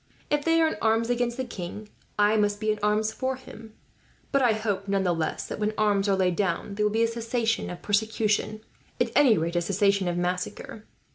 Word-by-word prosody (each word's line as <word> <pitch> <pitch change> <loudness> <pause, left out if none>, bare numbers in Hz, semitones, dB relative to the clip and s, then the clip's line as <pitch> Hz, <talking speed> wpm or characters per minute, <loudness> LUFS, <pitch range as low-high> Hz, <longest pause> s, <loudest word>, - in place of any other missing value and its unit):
If 295 0 +1
they 330 +1 +3
are 325 - +4
in 315 - -3
arms 225 +1 +2
against 240 0 -1
the 260 - -2
king, 210 -1 -7 0.3
I 210 +1 +4
must 205 -1 +1
be 215 0 +1
in 210 - -3
arms 210 +1 +1
for 260 0 -2
him; 225 -4 -13 0.6
but 275 - +3
I 240 -3 +4
hope 205 -2 -2
none 195 -1 +1
the 180 -2 +2
less 160 -1 -3
that, - - -6
when 215 0 -1
arms 205 -1 +2
are 195 - +3
laid 185 -2 +1
down, 195 +1 -1
there 210 +1 -1
will - - -2
be 225 +2 +2
a - - +3
cessation 230 0 -1
of 175 - -8
persecution 215 0 0 0.4
at 240 -1 +1
any 265 -6 +5
rate, 165 +2 -2
a - - +2
cessation 200 +1 +1
of 175 0 -1
massacre. 180 +4 -4
215 Hz, 220 wpm, -26 LUFS, 195-230 Hz, 0.6 s, any